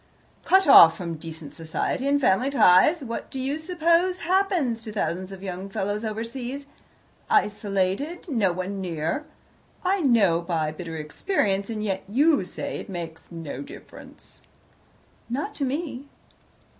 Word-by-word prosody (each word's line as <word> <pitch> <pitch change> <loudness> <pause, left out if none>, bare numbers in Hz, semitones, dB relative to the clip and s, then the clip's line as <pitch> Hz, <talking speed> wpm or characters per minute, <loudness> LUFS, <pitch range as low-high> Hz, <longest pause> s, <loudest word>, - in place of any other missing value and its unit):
"Cut 385 +1 +5
off 165 -11 +9
from 170 -2 -4
decent 160 -1 -9
society 165 +11 -2
and 285 0 +3
family 255 +1 +2
ties, 275 - +5
what 230 -2 -5
do 265 - -6
you 275 +4 -2
suppose 340 +2 +2
happens 355 - +1
to 220 - -7
thousands 185 -1 -2
of 195 0 -9
young 190 0 -5
fellows 205 +2 -2
overseas? 240 +5 -5 0.6
Isolated. 205 - 0
No 225 - +1
one 185 +2 -4
near. 170 - -2 0.6
I 390 +2 +2
know 210 - +3
by 165 -3 -1
bitter 165 0 -7
experience, 195 - -1
and 215 -2 -3
yet 195 -2 -2
you 285 +1 +3
say 180 - -5
it - - -9
makes 170 -3 -7
'no 165 -3 -6
difference.'" 290 +3 -13 0.9
"Not 285 - -3
to 280 - -2
me." 280 -1 -4
215 Hz, 140 wpm, -25 LUFS, 180-285 Hz, 0.9 s, off